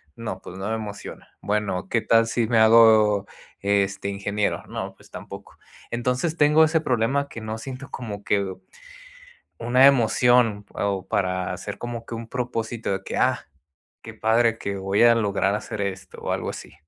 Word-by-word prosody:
No, 110 Hz, -5 st, -6 dB
pues 90 Hz, -, -10 dB
no 95 Hz, +2 st, -4 dB
me 110 Hz, -, 0 dB
emociona. 105 Hz, -2 st, -8 dB
Bueno, 100 Hz, -3 st, -2 dB
¿qué 115 Hz, -, +1 dB
tal 115 Hz, +1 st, +3 dB
si 115 Hz, 0 st, 0 dB
me 115 Hz, 0 st, +2 dB
hago, 110 Hz, -2 st, +6 dB, 0.4 s
este, 100 Hz, 0 st, 0 dB
ingeniero? 100 Hz, +1 st, -2 dB
No, -, -, -5 dB
pues -, -, -20 dB
tampoco. -, -, -10 dB, 0.3 s
Entonces 125 Hz, +7 st, -1 dB
tengo 150 Hz, +1 st, +5 dB
ese 160 Hz, 0 st, +1 dB
problema, 135 Hz, +2 st, 0 dB
que 115 Hz, -, -8 dB
no 110 Hz, 0 st, -5 dB
siento 135 Hz, +4 st, -8 dB
como 105 Hz, -5 st, -7 dB
que 100 Hz, -2 st, 0 dB, 1.1 s
una 125 Hz, +3 st, +5 dB
emoción 120 Hz, -4 st, +3 dB
o 100 Hz, -2 st, -2 dB
para 90 Hz, -1 st, -1 dB
hacer -, -, -7 dB
como 120 Hz, -1 st, -6 dB
que 115 Hz, -, -7 dB
un 115 Hz, 0 st, -7 dB
propósito 115 Hz, -3 st, -3 dB
de 95 Hz, 0 st, -3 dB
que: -, -, -5 dB
"Ah, -, -, +1 dB, 0.6 s
qué -, -, -9 dB
padre 115 Hz, +1 st, +2 dB
que 100 Hz, 0 st, -4 dB
voy 95 Hz, +3 st, +1 dB
a 120 Hz, 0 st, +7 dB
lograr 100 Hz, -3 st, +1 dB
hacer 105 Hz, 0 st, -5 dB
esto". 95 Hz, -2 st, -5 dB
O -, -, -4 dB
algo -, -, -2 dB
así. -, -, -10 dB
110 Hz, 170 wpm, -24 LUFS, 100-120 Hz, 1.1 s, a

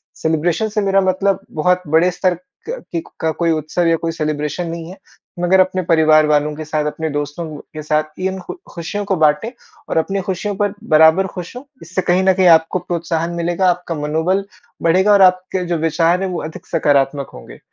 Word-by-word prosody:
Celebration 165 Hz, +6 st, 0 dB
से 210 Hz, 0 st, -1 dB
मेरा 195 Hz, -1 st, +3 dB
मतलब 190 Hz, +1 st, +1 dB
बहुत 180 Hz, +4 st, +1 dB
बड़े 165 Hz, +4 st, +3 dB
स्तर 180 Hz, +1 st, +1 dB, 0.4 s
का -, -, -3 dB
की 170 Hz, -, -1 dB, 0.2 s
का 160 Hz, -, 0 dB
कोई 165 Hz, +1 st, 0 dB
उत्सव 155 Hz, +2 st, -1 dB
या 165 Hz, -, +4 dB
कोई 165 Hz, 0 st, -2 dB
सेलिब्रेशन 155 Hz, +1 st, -3 dB
नहीं 165 Hz, 0 st, -6 dB
है, 185 Hz, -, -10 dB, 0.4 s
मगर 180 Hz, +2 st, +3 dB
अपने 185 Hz, 0 st, +2 dB
परिवार 155 Hz, -2 st, +4 dB
वालों 150 Hz, 0 st, +2 dB
के 155 Hz, +1 st, -7 dB
साथ, 150 Hz, 0 st, -1 dB
अपने 155 Hz, +1 st, -3 dB
दोस्तों 145 Hz, +3 st, -4 dB, 0.3 s
के 155 Hz, -, -6 dB
साथ 155 Hz, +1 st, -2 dB
इन 190 Hz, +1 st, -2 dB
खु 180 Hz, -, -7 dB, 0.2 s
खुशियों 175 Hz, +5 st, -4 dB
को 195 Hz, -, 0 dB
बाँटे 155 Hz, +9 st, +2 dB, 0.4 s
और -, -, -1 dB
अपनी 195 Hz, +4 st, 0 dB
खुशियों 190 Hz, +2 st, -3 dB
पर 205 Hz, 0 st, 0 dB, 0.2 s
बराबर 160 Hz, +5 st, +6 dB
खुश 180 Hz, +3 st, -8 dB
हों, 250 Hz, -, -7 dB, 0.2 s
इससे 180 Hz, +3 st, -2 dB
कहीं 180 Hz, +1 st, +2 dB
न 190 Hz, -, +4 dB
कहीं 185 Hz, -1 st, +3 dB
आपको 165 Hz, +2 st, +4 dB
प्रोत्साहन 170 Hz, -1 st, -2 dB
मिलेगा, 175 Hz, +2 st, +1 dB
आपका 175 Hz, -1 st, -2 dB
मनोबल 160 Hz, +6 st, 0 dB, 0.4 s
बढ़ेगा 185 Hz, +5 st, +4 dB
और 200 Hz, -, +5 dB
आपके 185 Hz, 0 st, +3 dB
जो 175 Hz, -1 st, -1 dB
विचार 165 Hz, +3 st, +1 dB
हैं 190 Hz, -, -1 dB
वो 180 Hz, -, -3 dB
अधिक 155 Hz, -, -9 dB
सकारात्मक 140 Hz, -3 st, +1 dB
होंगे। -, -, -12 dB
170 Hz, 195 wpm, -18 LUFS, 155-185 Hz, 0.4 s, बराबर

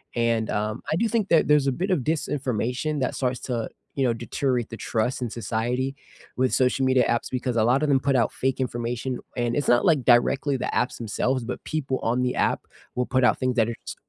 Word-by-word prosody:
and, 115 Hz, -2 st, +1 dB
um, 105 Hz, +1 st, -2 dB
I -, -, +2 dB
do 230 Hz, -, +2 dB
think 220 Hz, -3 st, 0 dB
that 165 Hz, -, +4 dB
there's 150 Hz, -2 st, +4 dB
a -, -, +3 dB
bit 180 Hz, +10 st, -2 dB
of 180 Hz, -, +3 dB
disinformation 140 Hz, 0 st, -1 dB
that 125 Hz, -, -1 dB
starts 125 Hz, -1 st, -1 dB
to, 120 Hz, -3 st, -3 dB, 0.3 s
you 135 Hz, -, 0 dB
know, 120 Hz, -2 st, +2 dB
deteriorate 120 Hz, +1 st, -2 dB
the 115 Hz, -, -7 dB
trust 115 Hz, +4 st, -1 dB
in 120 Hz, -, -2 dB
society 120 Hz, +4 st, -2 dB, 0.4 s
with 130 Hz, 0 st, +1 dB
social 130 Hz, +1 st, +2 dB
media 130 Hz, -1 st, +4 dB
apps 120 Hz, -, -1 dB
because 125 Hz, -1 st, -2 dB
a 110 Hz, -, +4 dB
lot 125 Hz, +5 st, +3 dB
of 150 Hz, -, +1 dB
them 135 Hz, -2 st, +4 dB
put 135 Hz, +1 st, +1 dB
out 120 Hz, -, +2 dB
fake 130 Hz, 0 st, -1 dB
information, 120 Hz, 0 st, -2 dB, 0.2 s
and 120 Hz, -1 st, -1 dB
it's 145 Hz, -2 st, -1 dB
not 120 Hz, 0 st, +4 dB
like 150 Hz, -8 st, +3 dB
directly 135 Hz, +3 st, +3 dB
the -, -, -3 dB
apps 125 Hz, -, 0 dB
themselves, 120 Hz, +3 st, -1 dB
but 120 Hz, -, -5 dB
people 140 Hz, -4 st, -2 dB
on 120 Hz, +2 st, +1 dB
the 125 Hz, 0 st, 0 dB
app -, -, 0 dB, 0.3 s
will 125 Hz, 0 st, 0 dB
put 130 Hz, -1 st, +1 dB
out 125 Hz, -, +4 dB
things 130 Hz, -1 st, 0 dB
that 115 Hz, -3 st, +3 dB
are -, -, -2 dB
s -, -, -5 dB
125 Hz, 230 wpm, -25 LUFS, 120-135 Hz, 0.4 s, that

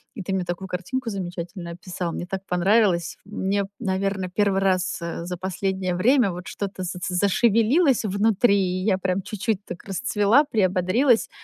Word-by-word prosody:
И 220 Hz, -, -5 dB
ты 190 Hz, -, -3 dB
мне 190 Hz, -1 st, 0 dB
такую 175 Hz, +2 st, -4 dB
картинку 230 Hz, +8 st, -3 dB
замечательную 175 Hz, -2 st, -5 dB
описал, 180 Hz, -2 st, -4 dB
мне -, -, -4 dB
так 190 Hz, +1 st, -5 dB
понравилось. 180 Hz, -1 st, +2 dB
Мне 200 Hz, 0 st, -1 dB
б, 195 Hz, -, -9 dB
наверно, 190 Hz, -2 st, -1 dB
1 195 Hz, 0 st, +1 dB
раз, 185 Hz, -1 st, +1 dB
э, 170 Hz, 0 st, -4 dB
за 180 Hz, 0 st, -4 dB
последнее 190 Hz, 0 st, -2 dB
время 230 Hz, +2 st, +3 dB
вот 180 Hz, +1 st, -8 dB
что-то 195 Hz, -2 st, -5 dB
заце 180 Hz, 0 st, -4 dB
зашевелилось 230 Hz, -, +3 dB
внутри, 200 Hz, +1 st, +3 dB
и 185 Hz, -1 st, 0 dB
я 195 Hz, -2 st, +2 dB
прям 190 Hz, 0 st, -1 dB
чуть-чуть 210 Hz, +1 st, -2 dB
так 175 Hz, -, -8 dB
расцвела, 205 Hz, -, +3 dB
приободрилась. 210 Hz, +2 st, +2 dB
190 Hz, 165 wpm, -24 LUFS, 180-210 Hz, -, время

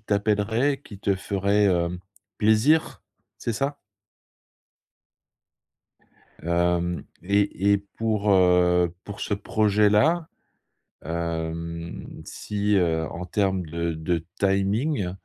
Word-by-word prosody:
t'appellerait, 110 Hz, +6 st, 0 dB
qui 100 Hz, -7 st, -11 dB
te 100 Hz, -1 st, +1 dB
ferait, 100 Hz, +2 st, +1 dB
hem, 90 Hz, -1 st, +1 dB, 0.4 s
plaisir, 110 Hz, +10 st, +3 dB, 0.3 s
c'est 115 Hz, -, -3 dB
ça? 140 Hz, +5 st, -2 dB, 2.7 s
Hem 85 Hz, 0 st, 0 dB, 0.2 s
et 100 Hz, 0 st, +1 dB
et 100 Hz, -, +5 dB
pour, 105 Hz, +1 st, -1 dB
heu, 90 Hz, -2 st, +4 dB
pour 100 Hz, -, -8 dB
ce -, -, -2 dB
projet-là, 105 Hz, -, +2 dB, 0.8 s
hem, 85 Hz, +1 st, -5 dB
si, 105 Hz, 0 st, -1 dB
heu, 80 Hz, -3 st, +1 dB
en 90 Hz, +1 st, -6 dB
termes 95 Hz, -2 st, 0 dB
de 85 Hz, +1 st, -3 dB
de 80 Hz, +1 st, -2 dB
timing, 100 Hz, -, +1 dB
100 Hz, 95 wpm, -25 LUFS, 85-105 Hz, 2.7 s, et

